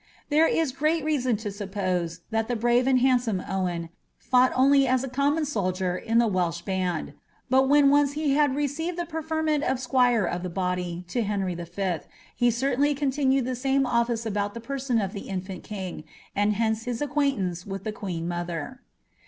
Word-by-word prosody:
There 315 +2 +5
is 320 -5 +1
great 305 +3 0
reason 255 -7 +1
to 210 -1 -5
suppose, 185 -4 -3
that 225 0 0
tha 245 - -1
bniv« 240 +2 +2
and 260 -2 +4
hsiidsonie 245 -7 +2
Owen 175 -3 -2 0.3
fought 255 0 +3
only 275 +1 +5
as 255 0 +2
a - - -3
comniun 285 +4 +1
soldier 185 -8 -1
in 225 +5 -1
the 235 - +5
Walsh 180 -5 0
band. 185 -3 -2 0.4
But 265 +1 +4
when 285 -1 +6
once 285 -1 +3
he 295 -2 0
had 290 -2 +3
received 300 +5 -2
the 345 - -2
preferment 315 -2 -1
uf 260 -2 +1
Mjuira 245 -6 +2
of 175 - -4
the 180 - -4
body 180 -1 -2
to 240 - 0
Henry 200 -4 -1
V., 175 +1 -3 0.4
he 245 -1 +3
certainly 275 +4 +1
continued 270 -2 +1
the 255 - -2
same 270 +2 +1
olfiee 235 -2 0
about 205 -1 -2
lh« 230 - -7
person 265 -2 -1
of 195 -1 -2
the 200 - -7
infant 190 -1 -5
king, 190 -6 -6 0.3
and 205 +1 +2
hence 220 +1 0
his 245 -2 -3
acquaintance 270 - -1
with 195 -1 -5
tha 215 - -2
qnaen 190 -7 -4
m 170 - -2
other. 175 +8 -4
235 Hz, 185 wpm, -26 LUFS, 190-275 Hz, 0.4 s, when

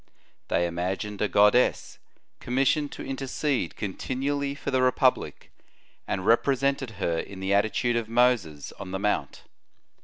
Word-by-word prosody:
They 85 - +1
imagined 95 +4 -3
a 105 - +2
goddess, 105 +6 +3 0.4
commissioned 135 +4 +1
to - - -7
intercede 135 +1 -2
continually 140 +7 -3
for 145 - -4
the 130 -1 +2
republic, 130 0 +1 0.6
and 95 -1 -2
represented 135 +2 +2
her 85 -4 -1
in 95 +2 -7
the 95 +1 -1
attitude 110 +4 +1
of 115 -2 -2
Moses 115 - +1
on - - -7
the 95 - -2
Mount. 105 +1 -2
120 Hz, 130 wpm, -26 LUFS, 100-135 Hz, 0.6 s, goddess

